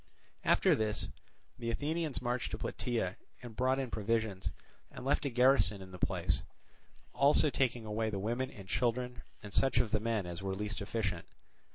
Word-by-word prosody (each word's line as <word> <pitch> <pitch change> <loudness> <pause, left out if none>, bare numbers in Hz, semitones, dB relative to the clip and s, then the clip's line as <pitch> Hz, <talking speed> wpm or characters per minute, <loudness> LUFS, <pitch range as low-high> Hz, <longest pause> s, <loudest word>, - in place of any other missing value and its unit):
After - - +5
this 105 -1 0 0.5
the 115 -1 -2
Athenians 150 +3 -1
marched 120 0 0
to - - -3
Plataea 115 -7 -2 0.3
and 120 -3 -8
brought 130 +2 +2
in 130 -3 -2
provisions, 110 -3 0 0.4
and 125 - -9
left 140 +2 +2
a - - +2
garrison 125 -4 +4
in 95 -1 -10
the 90 - -9
place, - - +1 0.7
also 145 +1 +5
taking 120 -4 +1
away 110 +1 -1
the 105 - -2
women 120 +6 -1
and 95 -2 -11
children 125 +3 0 0.2
and 100 -1 -8
such 135 -2 +3
of 110 - +3
the 110 - +3
men 110 -3 0
as 85 0 -5
were 95 0 -2
least 105 +1 -3
efficient. 100 -4 -2
115 Hz, 175 wpm, -34 LUFS, 105-125 Hz, 0.7 s, After